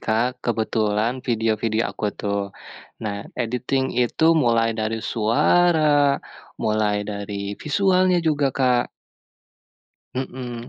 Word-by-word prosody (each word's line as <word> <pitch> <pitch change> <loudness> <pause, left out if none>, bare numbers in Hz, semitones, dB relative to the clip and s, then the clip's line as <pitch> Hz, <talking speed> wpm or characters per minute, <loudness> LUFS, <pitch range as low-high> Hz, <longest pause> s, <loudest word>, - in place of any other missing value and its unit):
Kak, 120 +3 0
kebetulan 110 +1 0
video-video 110 -1 0
aku 105 - -3
tuh. 100 -1 -1 0.6
Nah, 100 -1 -3 0.2
editing 125 +3 -1 0.2
itu 160 +6 +1 0.2
mulai 115 -1 +3
dari 110 +1 -1
suara, 145 +5 +3 0.5
mulai 105 -1 +1
dari 100 0 -5
visualnya 185 +2 +2
juga, 145 -2 +2
Kak. 125 -2 +2 1.3
Mhm. 125 -2 -5
120 Hz, 95 wpm, -22 LUFS, 110-135 Hz, 1.3 s, mulai